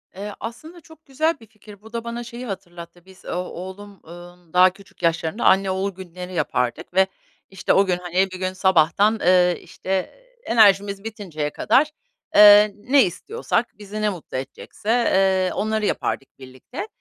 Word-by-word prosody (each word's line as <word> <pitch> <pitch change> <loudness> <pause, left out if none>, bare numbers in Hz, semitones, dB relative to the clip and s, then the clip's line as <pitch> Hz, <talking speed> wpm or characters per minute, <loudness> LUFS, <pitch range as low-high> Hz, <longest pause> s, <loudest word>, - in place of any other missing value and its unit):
Eee, 205 +2 -6
aslında 315 +10 -9
çok 320 0 -18
güzel 310 +3 -1
bir 225 - -15
fikir. 210 -1 -16
Bu 220 +2 -16
da 230 -1 -3
bana 235 +1 -5
şeyi 240 +1 -8
hatırlattı. 175 -4 -9
Biz 190 0 -18
o - - -5
oğlum, 190 +2 -7
ımm, 175 0 -14
daha 180 +1 +7
küçük 195 -2 -19
yaşlarında 165 +4 0
anne 190 0 +4
oğul 190 +1 -1
günleri 180 0 -9
yapardık 140 0 -2
ve, 190 +1 +4 0.4
işte, 190 -1 0
o 195 - +4
gün, 180 -2 0
hani, 180 +2 0
bir 185 - -8
gün 185 0 -2
sabahtan, 190 +3 +3
ııı, 180 0 +4
işte, 185 - -12 0.6
enerjimiz 200 -3 +3
bitinceye 185 -9 -5
kadar, 290 - +2 0.4
ııı, 210 0 +8
ne 255 +6 +3
istiyorsak, 230 - -3
bizi 210 +1 -7
ne 210 - +2
mutlu 175 -8 -6
edecekse, 135 +9 -8 0.6
ııı, - - -7
onları 215 +1 -1
yapardık 135 -9 -3
birlikte. 130 - -9
195 Hz, 160 wpm, -22 LUFS, 180-220 Hz, 0.6 s, ııı